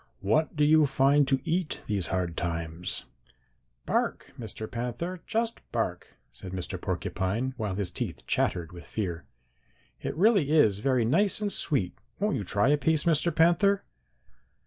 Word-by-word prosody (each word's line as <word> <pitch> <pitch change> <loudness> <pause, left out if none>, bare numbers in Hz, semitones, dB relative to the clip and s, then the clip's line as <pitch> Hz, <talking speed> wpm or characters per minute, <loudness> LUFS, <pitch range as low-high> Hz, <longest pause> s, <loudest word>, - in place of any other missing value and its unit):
'What 150 +13 +1
do 150 - +2
you 155 0 +5
find 135 +1 +3
to 135 0 +2
eat 170 0 -1
these 100 -6 -1
hard 90 -3 -1
times?' 85 0 -3 0.8
"'Bark, - - -1
Mr. 110 -1 -5
Panther, 125 +11 -4
just 230 +1 -1
bark,' - - -3 0.2
said 95 -1 -8
Mr. 90 -2 -4
Porcupine, 110 +8 -2
while 105 -6 -3
his 100 -3 -2
teeth - - -4
chattered 85 -3 0
with 85 -1 -11
fear. 90 -6 -3 0.8
'It - - -3
really 195 -6 +4
is 110 -11 +4
very 125 0 +2
nice 195 - +2
and 205 -1 -1
sweet. 120 - 0 0.2
Won't 205 -4 +1
you 110 - -2
try 105 +6 +1
a 145 0 +3
piece, 155 +2 +2
Mr. 165 0 +3
Panther?' 185 +5 +4
130 Hz, 150 wpm, -28 LUFS, 95-160 Hz, 0.8 s, you